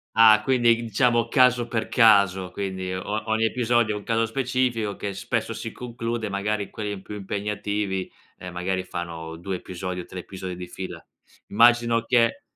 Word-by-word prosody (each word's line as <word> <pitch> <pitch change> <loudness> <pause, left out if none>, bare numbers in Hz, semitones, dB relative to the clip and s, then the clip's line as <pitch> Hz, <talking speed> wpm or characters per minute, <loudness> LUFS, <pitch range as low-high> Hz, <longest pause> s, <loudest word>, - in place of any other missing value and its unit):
Ah, 110 -1 +7
quindi 120 -3 +4
diciamo 115 +1 +1
caso 125 -2 +4
per 110 -2 -1
caso, 100 -6 +4
quindi 95 -1 -4
o 105 +3 -3
ogni 110 0 +2
episodio 120 -2 +1
è - - -3
un - - -11
caso 115 +1 +1
specifico, 125 -3 -1
che 100 -1 -4
spesso 100 - -2
si - - -5
conclude, 120 -2 -4
magari 100 +1 -2
quelli 105 -2 -5
più 105 - -9
impegnativi, 100 -1 -3 0.3
ehm, 90 -1 -8
magari 95 +1 -2
fanno 85 -2 -6
2 95 +2 -4
episodi 90 0 -5
o - - -7
3 95 - -9
episodi 95 -1 -7
di 90 0 -7
fila. 95 +1 -8 0.4
Immagino 115 +1 +4
che 115 -2 +2
105 Hz, 160 wpm, -24 LUFS, 95-115 Hz, 0.4 s, Ah